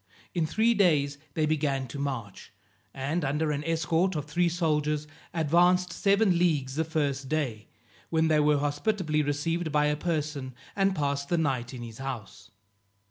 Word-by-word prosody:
In 165 -3 0
three 225 +7 +3
days 150 -9 +2 0.2
they 155 - +2
began 145 -3 0
to 140 - -6
march, 130 -8 -5 0.4
and, 145 +5 -2
under 150 +3 0
an 145 0 -2
escort 165 +3 +1
of 150 -2 -2
three 170 +3 +1
soldiers, 150 -3 0 0.3
advanced 175 +2 +3
seven 200 -3 +3
leagues 150 -7 +1
the 160 +3 0
first 145 -4 -1
day, 130 -9 -2 0.4
when 160 -1 +2
they 155 -1 +3
were 150 0 +4
hospitably 150 +3 0
received 155 +3 -1
by 150 0 +3
a 150 0 +2
person, 150 -5 -3 0.2
and 195 -1 +2
passed 140 -2 -1
the 175 - +2
night 130 -6 0
in 125 -2 -7
his 115 0 -9
house. 130 -7 -7
150 Hz, 160 wpm, -28 LUFS, 140-170 Hz, 0.4 s, were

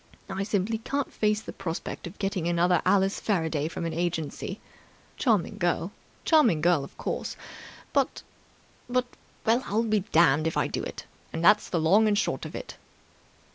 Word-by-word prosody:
I 190 0 -2
simply 205 +2 0
can't 280 +4 -3
face 210 0 +1
the - - -8
prospect 175 -2 -5
of 175 - -11
getting 195 -4 -1
another 175 0 +3
Alice 195 0 +3
Faraday 160 -7 0
from 170 - -5
an 165 - -2
agency. 165 -2 -3 0.6
Charming 210 -3 +1
girl, 175 +1 0 0.3
charming 280 - +5
girl, 165 -2 +3
of 140 - -11
course, - - -3 0.6
but... - - +1 0.7
but... 250 0 +1 0.4
well, 230 +3 +3
I'll 220 +3 +1
be 215 -2 +2
damned 160 -5 +3
if 160 - -2
I - - +2
do - - -3
it, - - -7 0.3
and 165 +1 -2
that's 210 +2 +5
the 170 - 0
long 195 +8 +4
and 205 -1 +2
short - - -1
of - - -10
it!" - - -7
190 Hz, 170 wpm, -27 LUFS, 165-215 Hz, 0.7 s, charming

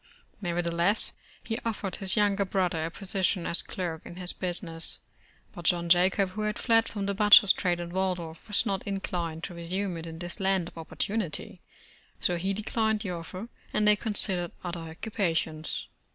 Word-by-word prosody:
Nev 175 -3 -2
ertheless, 170 +4 +1 0.3
he 225 - -3
offered 210 -4 -2
his 190 -2 +1
younger 205 -1 +3
brother 180 -4 0
a - - -2
position 190 -1 0
as 170 - +1
clerk 170 -4 -4
in 175 - -10
his 180 0 -4
business, 170 -2 -3 0.6
but 175 - -9
John 170 0 +2
Jacob, 185 +2 +4
who 215 +3 -5
had 210 0 -1
fled 225 -1 +3
from 200 -2 -3
the 200 - 0
batcher's 205 -1 +8
trade 175 -2 0
in 170 0 -5
Waldorf, 180 -3 -2
v\^as 210 - +4
not 195 -1 0
in 195 -1 -1
clined 165 -3 -3
to 180 - -4
resume 175 +2 -3
it 165 0 -7
in 160 0 -7
this 175 0 -6
land 190 -3 +1
of - - -19
opportunity, 175 0 -3 0.6
so 175 - +2
he 190 +3 -1
declined 215 +1 0
the 200 -4 -3
offer, 180 +5 -6 0.3
and 210 - +2
they 210 - +7
considered 195 -5 +4
other 175 -1 -3
occupa 165 +2 -2
tions. 155 -1 -3
185 Hz, 180 wpm, -28 LUFS, 170-200 Hz, 0.6 s, batcher's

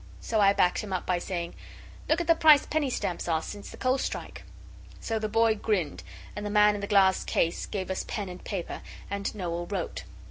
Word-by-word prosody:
So 220 -2 0
I 200 -1 +6
backed 180 -2 +2
him 210 - -5
up 185 - -2
by 180 -1 +1
saying 175 -2 -4 0.6
'Look 315 - +3
at 345 - -1
the 330 - +6
price 310 -3 +6
penny 300 -3 0
stamps 180 -9 -2
are 160 -2 +1
since 205 -1 -8
the - - -11
coal 260 +1 +1
strike!' - - -4 0.6
So 225 -1 -2
the 215 0 -2
boy 225 +1 +4
grinned, 205 -7 -1 0.3
and 205 - -5
the 205 - -3
man 210 0 +5
in 205 - -4
the 200 - -3
glass 195 -2 +4
case 165 0 0
gave 190 -2 -3
us 190 - -2
pen 205 -3 -3
and 180 0 -9
paper, 190 -5 -4 0.3
and 200 +1 -3
Noel 175 -3 -3
wrote. 190 -3 -4
200 Hz, 215 wpm, -28 LUFS, 180-220 Hz, 0.6 s, I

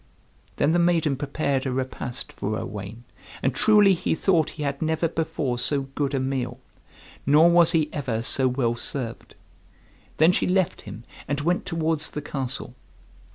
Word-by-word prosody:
Then 145 - +2
the 175 - +3
maiden 170 -4 +2
prepared 140 -1 -1
a - - -1
repast 130 -1 -4
for 110 +2 -3
Owain, 105 +2 -7 0.4
and 135 - +1
truly 205 - +5
he 185 -1 -1
thought 170 -3 +2
he 150 - -3
had 140 -1 -3
never 160 +1 +1
before 155 -6 -2
so 140 +2 +1
good 140 -1 -1
a - - +1
meal, 130 -1 -2 0.6
nor 155 +5 +5
was 170 -1 +6
he 160 -2 +2
ever 125 -6 -2
so 130 +2 +2
well 125 -2 0
served. 120 0 -5 0.8
Then 160 +3 +6
she - - 0
left 185 -1 +1
him, 115 - -9 0.2
and 145 +1 -1
went 175 +4 0
towards 160 -1 0
the 150 - -5
castle. 135 -3 -4
145 Hz, 160 wpm, -24 LUFS, 130-165 Hz, 0.8 s, was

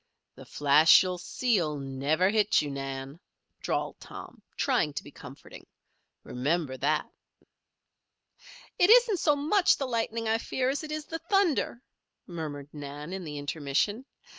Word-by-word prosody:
"The - - -13
flash 150 +4 +5
you 180 -1 -3
see'll 180 -8 0
never 140 +7 0
hit 215 -1 +3
you, 145 -2 -2
Nan," 135 +2 -6 0.4
drawled - - -3
Tom, - - -11 0.2
trying 240 - +1
to - - -5
be 145 - -12
comforting. 135 0 -13 0.6
"Remember 140 +2 -2
that." - - 0 1.7
"It 360 +1 +5
isn't 465 -5 +6
so 300 -2 +3
much 345 +7 +3
the 275 - -2
lightning 230 -2 -2
I 225 +1 +1
fear 255 +2 -1
as 285 +3 -4
it 305 - -7
is 305 0 -4
the 325 +1 -5
thunder," 335 - 0 0.4
murmured 150 -5 -6
Nan, 145 +3 -7
in 190 -1 -5
the 150 -2 -6
intermission. 145 - -1
180 Hz, 140 wpm, -28 LUFS, -, 1.7 s, isn't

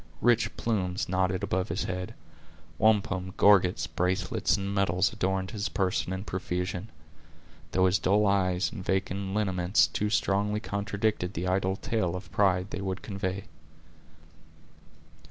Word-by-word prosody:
Rich 120 0 +3
plumes 95 -4 -1
nodded 95 0 0
above 95 -1 -1
his 85 +5 -1
head; 90 0 -4 0.6
wampum, 100 -4 +2
gorgets, 95 -3 +5
bracelets, 90 +1 0
and 100 0 -3
medals, 95 -1 +2
adorned 95 0 -1
his 105 -1 -3
person 95 -2 -1
in 95 +1 -3
profusion; 90 +1 -3 0.8
though 95 0 +3
his 95 +2 +3
dull 105 +3 +3
eye 95 -2 +2
and 100 -5 -7
vacant 95 +1 -1
lineaments 95 -2 +2
too 105 - -2
strongly 105 0 +1
contradicted 100 -2 -2
the 90 +3 -2
idle 95 +1 +1
tale 95 -4 -1
of 90 - -8
pride 95 -1 +2
they 95 - -4
would 95 -1 -4
convey. 100 -2 -3
95 Hz, 135 wpm, -28 LUFS, 90-100 Hz, 0.8 s, gorgets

